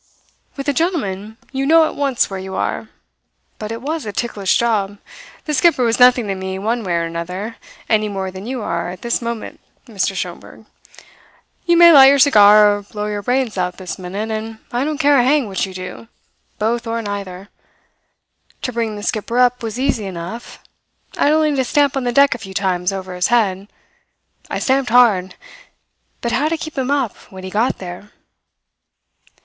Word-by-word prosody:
"With 275 +1 -5
a 285 - +2
gentleman 220 - -2
you 270 0 -2
know 325 +1 +6
at - - -4
once 275 -4 +1
where 195 -1 -6
you 190 0 -7
are; - - -3 0.7
but 215 0 -5
it 230 +2 -6
was 315 +2 -3
a 210 - -5
ticklish 200 -4 0
job. 205 -4 0 0.5
The 300 - -2
skipper 295 -2 +3
was 230 0 +1
nothing 250 -1 +6
to 200 - -2
me 190 0 -5
one 225 +4 -2
way 180 -3 -1
or 170 - 0
another, 180 +6 -5 0.3
any 215 -1 +1
more 190 -2 -4
than 190 +3 -9
you 250 -3 -4
are 170 -1 -2
at 180 0 -9
this 235 0 -1
moment, 235 -1 -5 0.3
Mr. 200 -3 -2
Schomberg. 180 +4 -7 1.0
You 345 0 +4
may 340 0 +9
light 275 -4 +9
your 280 +1 +6
cigar 210 -6 +6
or - - -11
blow 210 +1 -6
your 210 -1 -3
brains 245 -3 -1
out 180 0 -2
this 185 0 -7
minute, 200 +5 -4
and 220 0 -5
I 245 +2 0
don't 305 0 -2
care 290 -2 +4
a - - +4
hang 275 -1 +2
which 195 0 -2
you 190 - -10
do, 185 +4 -8 0.5
both 230 +2 -1
or 230 0 -2
neither. 200 -1 -6 1.1
To 250 - -2
bring 225 -2 -2
the 205 - -8
skipper 230 +2 -2
up 250 0 +3
was 225 +1 -5
easy 260 -6 0
enough. 185 +6 -8 0.5
I - - +1
had 295 - +4
only 310 -2 +2
to 265 - +1
stamp 285 +2 +1
on 270 -2 -2
the 245 - +1
deck 280 +3 +5
a 235 - -8
few 195 -3 -10
times 185 -1 0
over 190 -1 -6
his 180 -1 0
head. 200 -5 +1 0.8
I - - -2
stamped 265 -1 +1
hard. 215 -7 +4 0.9
But 235 - -2
how 275 +6 +1
to 330 - -1
keep 315 0 -7
him 265 -2 -2
up 275 -6 0
when 190 -1 -11
he 185 - -7
got 220 +5 +1
there? 180 +2 -9
220 Hz, 195 wpm, -18 LUFS, 195-260 Hz, 1.1 s, may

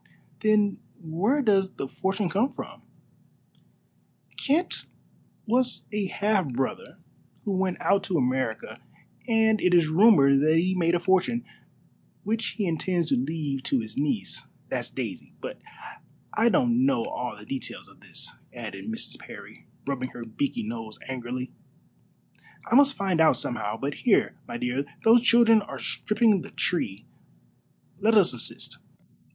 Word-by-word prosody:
"Then 210 -2 +3 0.2
where 200 - 0
does 195 -4 +2
the 135 - -4
fortune 195 +6 -1
come 210 +10 +1
from?" - - -9 1.5
"Kent 315 +6 +1 0.6
was 245 +2 +1
a 205 -2 -1
half 195 -6 0
brother 130 +1 -3 0.5
who 205 - -1
went 185 -1 -1
out 200 0 +2
to 185 -3 0
America, 130 -4 -1 0.5
and 220 -2 +3
it 180 -1 +4
is 170 -3 +5
rumored 155 -7 +6
that 155 +2 +4
he 185 +3 +2
made 175 -2 +2
a - - +2
fortune, 190 +6 +1 0.8
which 225 +2 -2
he 210 - 0
intends 170 0 0
to - - +3
leave 140 +1 -2
to 135 -2 0
his 110 -1 -9
niece 150 +9 -2 0.2
that's - - -3
Daisy. - - -6
But - - -7 0.7
I 225 +2 +3
don't 245 -2 +3
know 270 -4 +2
all 295 +4 -4
the - - -12
details - - -6
of - - -20
this," - - -7 0.2
added - - -7
Mrs. 225 +1 -5
Parry, - - -12 0.2
rubbing 130 -2 -2
her 120 -1 -7
beaky 115 +4 -2
nose 110 0 -6
angrily; 125 0 -5 1.1
"I - - -4
must 275 +1 +6
find 190 -4 +1
out 155 -6 +5
somehow. 110 -3 -2
But 140 +3 -3
here, - - +2
my - - -5
dear, 125 +3 -1 0.2
those 230 +1 +7
children 230 -2 +5
are - - -7
stripping 215 -3 +1
the - - -9
tree. 105 - -2 0.9
Let 220 +2 +3
us 195 -9 +5
assist. 120 - -3
185 Hz, 145 wpm, -26 LUFS, 140-220 Hz, 1.5 s, those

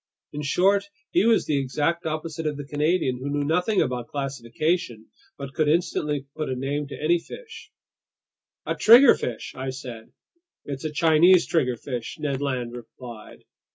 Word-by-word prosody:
In 150 - -4
short, 195 +7 +2 0.2
he 350 -8 +3
was 230 -1 +3
the 145 -2 +1
exact 150 +6 -1
opposite 155 0 -3
of 150 -1 -2
the 145 - -6
Canadian, 150 -2 0
who 135 +2 -4
knew 145 0 -1
nothing 180 +7 +2
about 125 -2 -4
classification 135 -2 -3 0.3
but 140 -1 -7
could 155 +1 +1
instantly 150 -3 0
put 155 - -3
a 130 - -1
name 140 +3 -2
to - - -9
any 170 +3 +2
fish. 475 - -11 0.9
"A - - -1
triggerfish," 230 - +5
I 130 0 -5
said. 125 -4 -8 0.5
"It's 140 0 -6
a 155 - -2
Chinese 165 +3 +5
triggerfish," 125 -5 -2
Ned 140 -2 -2
Land 125 -4 -2
replied. 120 -2 -11
145 Hz, 155 wpm, -25 LUFS, 130-165 Hz, 0.9 s, triggerfish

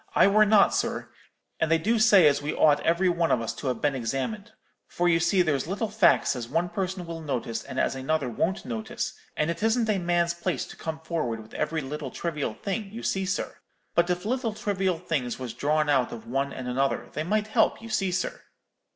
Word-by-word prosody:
'I - - +6
were 215 +1 +5
not, 210 -1 +5
sir; - - -1 0.5
and 160 - +1
they 165 - +5
do 220 +8 +1
say 205 -6 +7
as 145 -1 +4
we 145 - -3
ought 150 -1 +5
every 170 +4 +2
one 170 -2 +1
of 125 - +3
us 115 - -3
to 140 - -6
have 125 -3 -2
been 145 -1 +2
examined; 135 - -3 0.4
for 175 - 0
you 165 -1 +4
see 175 +2 +3
there's 145 -4 0
little 205 +4 -2
facks 215 -9 +4
as 120 -2 -5
one 165 +5 0
person 185 -1 -3
will 165 -1 -6
notice 125 -6 -3
and - - -5
as - - +1
another 135 +2 -1
won't 165 - -1
notice, 115 -3 -4 0.2
and 155 +2 +1
it 170 - -6
isn't 225 +1 +2
a 205 -2 +2
man's 170 -1 +1
place 170 0 -2
to - - -11
come 160 -1 -5
forward 155 -9 -2
with 110 0 -13
every 155 +1 -1
little 145 0 -5
trivial 150 -7 -3
thing, 200 0 -4
you 230 +2 -7
see, 195 -1 -1
sir; 185 - -3 0.4
but 170 +1 +2
if 180 +2 -1
little 235 -2 -1
trivial 195 -4 0
things 155 -8 -2
was 125 -3 -6
drawn 150 +4 +1
out 130 -4 +2
of 115 -1 -8
one 135 +4 -1
and 130 -2 -6
another, 135 +2 -1
they 150 - -2
might 210 +5 0
help, 215 - +2
you 230 - -10
see, 195 -3 0
sir.' 185 +1 -2
165 Hz, 220 wpm, -26 LUFS, 135-195 Hz, 0.5 s, say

